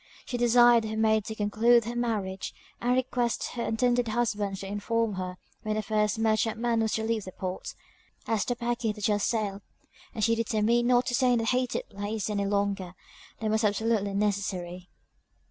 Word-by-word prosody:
She 250 Hz, -, -4 dB
desired 240 Hz, -1 st, +5 dB
her 220 Hz, 0 st, -4 dB
maid 220 Hz, -1 st, +2 dB
to 220 Hz, -, -5 dB
conclude 220 Hz, +3 st, +3 dB
her 235 Hz, +1 st, -4 dB
marriage, 210 Hz, -6 st, -2 dB, 0.3 s
and 245 Hz, +1 st, +2 dB
request 250 Hz, -2 st, 0 dB
her 240 Hz, -, -5 dB
intended 245 Hz, +1 st, +1 dB
husband 215 Hz, -4 st, -1 dB
to 195 Hz, -, -7 dB
inform 210 Hz, +2 st, -1 dB
her 185 Hz, -1 st, -5 dB, 0.2 s
when 215 Hz, -1 st, -2 dB
the 215 Hz, -, -1 dB
first 210 Hz, 0 st, +1 dB
merchantman 225 Hz, +1 st, +1 dB
was 220 Hz, -1 st, 0 dB
to 220 Hz, -, -1 dB
leave 225 Hz, -1 st, -1 dB
the 185 Hz, -, -7 dB
port, 185 Hz, 0 st, -5 dB, 0.5 s
as 220 Hz, -3 st, +1 dB
the 245 Hz, -, -1 dB
packet 235 Hz, -2 st, -2 dB
had 210 Hz, -, -9 dB
just 205 Hz, -1 st, +2 dB
sailed, 205 Hz, -3 st, -2 dB, 0.5 s
and 215 Hz, -, -2 dB
she 230 Hz, -, +4 dB
determined 230 Hz, +1 st, +1 dB
not 245 Hz, 0 st, +4 dB
to 245 Hz, -, -2 dB
stay 250 Hz, -1 st, +3 dB
in -, -, +3 dB
that 225 Hz, -1 st, 0 dB
hated 250 Hz, -1 st, 0 dB
place 205 Hz, +1 st, -3 dB
any 200 Hz, -1 st, -1 dB
longer 200 Hz, -3 st, -1 dB, 0.4 s
than 220 Hz, -1 st, -1 dB
was 220 Hz, +1 st, +1 dB
absolutely 210 Hz, -1 st, +1 dB
necessary. 190 Hz, -3 st, -2 dB
220 Hz, 180 wpm, -28 LUFS, 205-235 Hz, 0.5 s, desired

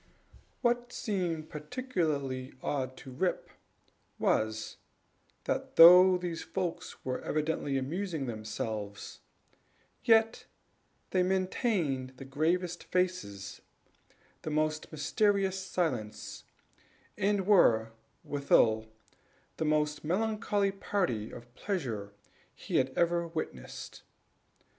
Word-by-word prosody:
What 240 Hz, 0 st, +1 dB
seemed 175 Hz, -9 st, -2 dB
particularly 150 Hz, -, -2 dB
odd 130 Hz, -2 st, -2 dB
to 130 Hz, -, -10 dB
Rip 175 Hz, +8 st, -1 dB, 0.7 s
was, 110 Hz, 0 st, 0 dB, 0.7 s
that -, -, -2 dB
though 180 Hz, +2 st, +9 dB
these 175 Hz, -2 st, -4 dB
folks 180 Hz, -3 st, -4 dB
were 130 Hz, -1 st, -2 dB
evidently 155 Hz, -2 st, -1 dB
amusing 160 Hz, +2 st, -2 dB
themselves, 110 Hz, -2 st, -5 dB, 0.8 s
yet 225 Hz, 0 st, +3 dB, 0.6 s
they 185 Hz, -, +3 dB
maintained 180 Hz, -, 0 dB
the 135 Hz, -, -9 dB
gravest 170 Hz, +6 st, -1 dB
faces, 180 Hz, -, -2 dB, 0.8 s
the -, -, -4 dB
most 155 Hz, 0 st, -1 dB
mysterious 195 Hz, +4 st, +1 dB
silence, 125 Hz, -, -3 dB, 0.7 s
and 200 Hz, -1 st, +1 dB
were, 115 Hz, -, +5 dB, 0.3 s
withal, 110 Hz, -6 st, +3 dB, 0.7 s
the 160 Hz, -, -1 dB
most 150 Hz, -1 st, +1 dB
melancholy 205 Hz, +2 st, 0 dB
party 180 Hz, -, -1 dB
of 120 Hz, 0 st, -12 dB
pleasure 120 Hz, -, -3 dB, 0.4 s
he -, -, -2 dB
had 130 Hz, 0 st, +3 dB
ever 170 Hz, 0 st, +2 dB
witnessed. 160 Hz, -, -6 dB
160 Hz, 90 wpm, -31 LUFS, 130-185 Hz, 0.8 s, though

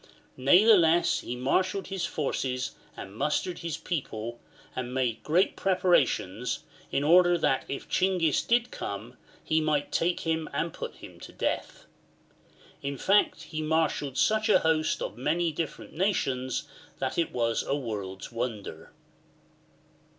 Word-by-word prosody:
Natheless 175 Hz, -, +5 dB
he 125 Hz, -, -5 dB
marshalled 185 Hz, +10 st, 0 dB
his 190 Hz, -3 st, -2 dB
forces 135 Hz, -3 st, -2 dB, 0.3 s
and 95 Hz, +1 st, -8 dB
mustered 150 Hz, +8 st, -1 dB
his 165 Hz, -2 st, -4 dB
people, 120 Hz, -9 st, -4 dB, 0.4 s
and 125 Hz, 0 st, -4 dB
made 125 Hz, -4 st, 0 dB
great 175 Hz, +5 st, +2 dB
pre 190 Hz, -1 st, +1 dB
parations, 130 Hz, -, +1 dB, 0.3 s
in 140 Hz, -, +1 dB
order 175 Hz, +3 st, +6 dB
that 140 Hz, -5 st, +1 dB
if 140 Hz, -, -5 dB
Chinghis 180 Hz, -6 st, +2 dB
did 240 Hz, +1 st, +1 dB
come, 110 Hz, +5 st, -6 dB, 0.3 s
he 160 Hz, 0 st, +1 dB
might 150 Hz, -2 st, 0 dB
take 175 Hz, +1 st, +1 dB
him 160 Hz, -1 st, -1 dB
and 165 Hz, -1 st, -1 dB
put -, -, -6 dB
him -, -, -12 dB
to -, -, -10 dB
death. -, -, -3 dB, 1.0 s
In 140 Hz, 0 st, -3 dB
fact 200 Hz, +9 st, +2 dB
he 155 Hz, -1 st, -5 dB
marshalled 155 Hz, -3 st, 0 dB
such 220 Hz, 0 st, +2 dB
an -, -, +5 dB
host 160 Hz, -1 st, +1 dB
of -, -, -6 dB
many 165 Hz, +5 st, +1 dB
different 155 Hz, 0 st, -5 dB
nations 135 Hz, -9 st, -1 dB, 0.3 s
that -, -, -2 dB
it 165 Hz, -, 0 dB
was 115 Hz, -2 st, 0 dB
a 140 Hz, -, -1 dB
world's 105 Hz, -8 st, -5 dB
wonder. 110 Hz, -9 st, -5 dB
155 Hz, 140 wpm, -28 LUFS, 125-175 Hz, 1.0 s, order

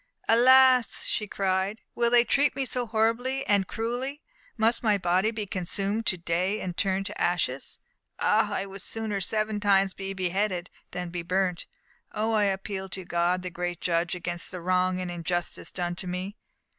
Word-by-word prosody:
"Alas," 255 Hz, +1 st, +6 dB
she 210 Hz, -, -1 dB
cried, 195 Hz, +2 st, -1 dB
"will 235 Hz, 0 st, +2 dB
they 240 Hz, 0 st, +6 dB
treat 280 Hz, +3 st, +2 dB
me 270 Hz, 0 st, -1 dB
so 250 Hz, -1 st, -1 dB
horribly 230 Hz, +5 st, 0 dB
and 200 Hz, -2 st, +2 dB
cruelly? 250 Hz, +6 st, -3 dB, 0.3 s
Must 225 Hz, +2 st, +2 dB
my 215 Hz, -3 st, +3 dB
body 185 Hz, +3 st, +2 dB
be 215 Hz, -2 st, -4 dB
consumed 195 Hz, +4 st, -1 dB
to 180 Hz, -, +2 dB
day 180 Hz, +5 st, -1 dB
and 180 Hz, -2 st, -4 dB
turned 195 Hz, +1 st, 0 dB
to -, -, -6 dB
ashes? 160 Hz, -7 st, -1 dB, 0.4 s
Ah! -, -, +3 dB
I 195 Hz, -, -1 dB
would 195 Hz, 0 st, -9 dB
sooner 215 Hz, -2 st, -1 dB
seven 215 Hz, +2 st, -1 dB
times 195 Hz, -2 st, +3 dB
be 195 Hz, 0 st, -5 dB
beheaded 185 Hz, 0 st, -1 dB, 0.2 s
than 180 Hz, 0 st, -5 dB
be 175 Hz, 0 st, -3 dB
burnt! 180 Hz, 0 st, -1 dB, 0.5 s
Oh, 220 Hz, +1 st, 0 dB
I 210 Hz, -1 st, +3 dB
appeal 195 Hz, 0 st, -3 dB
to 185 Hz, 0 st, -6 dB
God, 175 Hz, +1 st, 0 dB
the 180 Hz, -, -5 dB
great 175 Hz, -1 st, -3 dB
Judge, 170 Hz, 0 st, 0 dB
against 175 Hz, -1 st, -4 dB
the 180 Hz, -, -6 dB
wrong 185 Hz, +1 st, +1 dB
and 180 Hz, -1 st, -3 dB
injustice 175 Hz, 0 st, -3 dB
done 175 Hz, -1 st, -2 dB
to 185 Hz, -, -4 dB
me!" 185 Hz, +3 st, -4 dB
195 Hz, 175 wpm, -27 LUFS, 180-220 Hz, 0.5 s, Alas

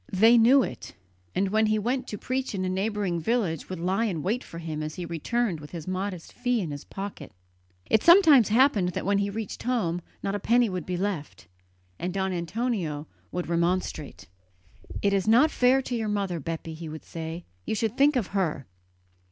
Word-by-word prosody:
They 225 Hz, +5 st, +6 dB
knew 245 Hz, +4 st, +6 dB
it, -, -, -7 dB, 0.4 s
and 195 Hz, 0 st, +1 dB
when 220 Hz, +2 st, +3 dB
he 215 Hz, 0 st, +2 dB
went 250 Hz, +5 st, -1 dB
to 210 Hz, -, -5 dB
preach 255 Hz, -1 st, -3 dB
in 185 Hz, -1 st, -1 dB
a -, -, -1 dB
neighbouring 195 Hz, -2 st, -1 dB
village 180 Hz, -, -1 dB
would 185 Hz, -, -4 dB
lie 190 Hz, +6 st, +1 dB
in 170 Hz, -9 st, -2 dB
wait 225 Hz, +6 st, -1 dB
for 165 Hz, -, -10 dB
him 160 Hz, -2 st, -4 dB
as 155 Hz, 0 st, -4 dB
he 180 Hz, -, -5 dB
returned 175 Hz, +3 st, -1 dB
with 150 Hz, 0 st, -10 dB
his 165 Hz, -2 st, -8 dB
modest 185 Hz, -2 st, -4 dB
fee 245 Hz, -1 st, 0 dB
in 170 Hz, -7 st, -3 dB
his 145 Hz, 0 st, -6 dB
pocket. 195 Hz, -7 st, -7 dB, 0.6 s
It 220 Hz, -, +3 dB
sometimes 325 Hz, -, +7 dB
happened 215 Hz, -6 st, +3 dB
that -, -, -3 dB
when 200 Hz, +1 st, +2 dB
he 200 Hz, 0 st, 0 dB
reached 215 Hz, 0 st, -5 dB
home 210 Hz, -9 st, 0 dB, 0.2 s
not 195 Hz, -, -1 dB
a 205 Hz, -, -1 dB
penny 235 Hz, +3 st, +3 dB
would 180 Hz, -4 st, -4 dB
be 180 Hz, -1 st, -2 dB
left, 170 Hz, -, -4 dB, 0.5 s
and 180 Hz, -, -2 dB
Don 190 Hz, 0 st, -1 dB
Antonio 170 Hz, -4 st, -2 dB, 0.3 s
would 180 Hz, 0 st, -3 dB
remonstrate. 170 Hz, -, -1 dB, 0.8 s
"It 200 Hz, 0 st, +3 dB
is 195 Hz, -1 st, +1 dB
not 250 Hz, +8 st, +5 dB
fair 255 Hz, +2 st, +3 dB
to 250 Hz, -, -3 dB
your 220 Hz, -2 st, -2 dB
mother, 195 Hz, -4 st, -1 dB
Bepi," 165 Hz, +2 st, -5 dB
he 160 Hz, 0 st, -7 dB
would 155 Hz, 0 st, -8 dB
say; 165 Hz, +1 st, -6 dB, 0.2 s
"you -, -, 0 dB
should 225 Hz, +1 st, -1 dB
think 285 Hz, +2 st, +4 dB
of 235 Hz, -7 st, 0 dB
her." 165 Hz, -9 st, -1 dB
195 Hz, 200 wpm, -27 LUFS, 170-230 Hz, 0.8 s, sometimes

